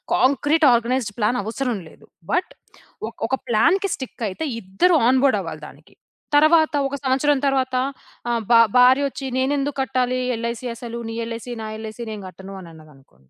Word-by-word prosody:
Concrete 290 Hz, +4 st, +3 dB
organised 235 Hz, -1 st, 0 dB
plan 225 Hz, +3 st, +1 dB
అవసరం 235 Hz, +2 st, -2 dB
లేదు. -, -, -18 dB, 0.3 s
But 360 Hz, -, 0 dB, 0.6 s
ఒక్ 230 Hz, -, -11 dB
ఒక 260 Hz, -, +1 dB
ప్లాన్‌కి 350 Hz, -, +3 dB
స్టికయితే 235 Hz, -1 st, -5 dB, 0.2 s
ఇద్దరు 195 Hz, -, +2 dB
ఆన్‌బోర్డ్ 260 Hz, -2 st, +4 dB
అవ్వాలి 165 Hz, -4 st, -6 dB
దానికి. -, -, -17 dB, 0.4 s
తర్వాత 310 Hz, +2 st, +5 dB
ఒక 275 Hz, -, -4 dB
సంవత్సరం 275 Hz, +2 st, +2 dB
తర్వాత 260 Hz, -1 st, 0 dB, 0.5 s
ఆహ్, 235 Hz, -1 st, 0 dB
బా 230 Hz, -, +8 dB, 0.2 s
భార్యొచ్చి, 270 Hz, +2 st, +4 dB
నేనెందుకు 280 Hz, +2 st, 0 dB
కట్టాలి? 255 Hz, -1 st, 0 dB, 0.2 s
ఎల్‌ఐసీ 235 Hz, +2 st, -4 dB
అసలు 235 Hz, 0 st, -7 dB
నీ -, -, -5 dB
ఎల్‌ఐసీ, 230 Hz, +1 st, -6 dB
నా 220 Hz, -, -5 dB
ఎల్‌ఐసీ, 220 Hz, +2 st, -7 dB
నేను 210 Hz, -1 st, -6 dB
గట్టను 190 Hz, +2 st, -10 dB
అని 175 Hz, -3 st, -11 dB
అన్నదనుకోండి. 135 Hz, -, -19 dB
245 Hz, 150 wpm, -22 LUFS, 215-275 Hz, 0.6 s, బా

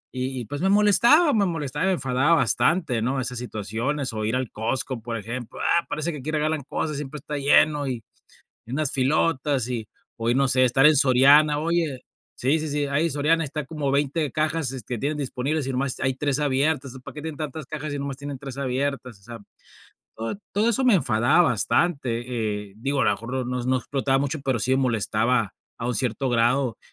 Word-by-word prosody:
y 130 Hz, -1 st, -3 dB
pues, 145 Hz, +8 st, -6 dB
me 190 Hz, -, +2 dB
molestaba, 235 Hz, -, +5 dB
me 205 Hz, -3 st, +3 dB
molestaba, 150 Hz, 0 st, -2 dB
me 190 Hz, -, +3 dB
enfadaba 135 Hz, 0 st, +2 dB
bastante, 145 Hz, -1 st, +1 dB
¿no?, 130 Hz, +4 st, 0 dB
esas 125 Hz, -1 st, -3 dB
situaciones, 120 Hz, +4 st, -3 dB
o, 110 Hz, -1 st, -3 dB
ir 110 Hz, +3 st, 0 dB
al 130 Hz, -2 st, -2 dB
Costco, 120 Hz, +2 st, -2 dB
por 115 Hz, +1 st, -4 dB
ejemplo. 115 Hz, +3 st, -7 dB
Ah, 170 Hz, -, +1 dB
parece 155 Hz, +3 st, -2 dB
que 150 Hz, -, -7 dB
aquí 135 Hz, +4 st, -6 dB
regalan 155 Hz, 0 st, 0 dB
cosas, 155 Hz, -2 st, -2 dB
siempre 150 Hz, +1 st, -6 dB
está 150 Hz, +1 st, -6 dB
lleno, 145 Hz, +1 st, +3 dB
y 125 Hz, -4 st, -4 dB, 0.6 s
unas 135 Hz, +4 st, 0 dB
filotas, 135 Hz, -1 st, +1 dB
y 115 Hz, -3 st, -3 dB, 0.3 s
o 115 Hz, 0 st, -3 dB
y -, -, +2 dB
no 135 Hz, +1 st, +2 dB
sé, 130 Hz, 0 st, +4 dB
estar 135 Hz, +3 st, +4 dB
en 155 Hz, 0 st, +6 dB
Soriana, 140 Hz, +3 st, +5 dB
oye, 160 Hz, -5 st, -1 dB, 0.3 s
sí, 140 Hz, +6 st, +1 dB
sí, 155 Hz, -, -4 dB
sí, 145 Hz, 0 st, -1 dB
ahí 145 Hz, +4 st, 0 dB
Soriana 155 Hz, +3 st, +1 dB
está 150 Hz, +1 st, -4 dB
como 145 Hz, -1 st, -3 dB
20 145 Hz, +2 st, 0 dB
cajas 155 Hz, -4 st, -1 dB
que 120 Hz, +2 st, -4 dB
tienen 150 Hz, +5 st, -2 dB
disponibles, 140 Hz, +1 st, -2 dB
y -, -, -1 dB
nomás 135 Hz, 0 st, -2 dB
hay 130 Hz, 0 st, 0 dB
3 140 Hz, +1 st, -1 dB
abiertas, 140 Hz, 0 st, 0 dB
¿entonces, 130 Hz, 0 st, -11 dB
para -, -, -9 dB
qué 150 Hz, -, -7 dB
tienen 160 Hz, -1 st, -5 dB
tantas 155 Hz, 0 st, -5 dB
cajas, 150 Hz, 0 st, -5 dB
y 140 Hz, -, -3 dB
nomás 140 Hz, -1 st, -4 dB
tienen 140 Hz, 0 st, -6 dB
3 135 Hz, -1 st, -8 dB
abiertas?, 130 Hz, -4 st, -3 dB
o -, -, -28 dB
sea, 120 Hz, +3 st, -9 dB, 0.8 s
todo 115 Hz, -, -4 dB, 0.2 s
todo 215 Hz, +3 st, +2 dB
eso 235 Hz, +3 st, +1 dB
me 250 Hz, -5 st, +5 dB
enfadaba 120 Hz, -1 st, +3 dB
bastante, 120 Hz, -, -1 dB
eh, -, -, -22 dB
digo, 135 Hz, +4 st, -1 dB
a -, -, +2 dB
lo -, -, +4 dB
mejor 125 Hz, +2 st, -3 dB
no 125 Hz, 0 st, -3 dB
no 130 Hz, +1 st, +1 dB
explotaba 135 Hz, +1 st, 0 dB
mucho, 140 Hz, +2 st, -2 dB
pero, 130 Hz, -3 st, 0 dB
sí 130 Hz, +4 st, +1 dB
molestaba 115 Hz, -3 st, +1 dB, 0.2 s
a 115 Hz, -, -5 dB
un 125 Hz, -, 0 dB
cierto 125 Hz, +3 st, -1 dB
grado, 120 Hz, 0 st, +1 dB
135 Hz, 205 wpm, -24 LUFS, 125-150 Hz, 0.8 s, en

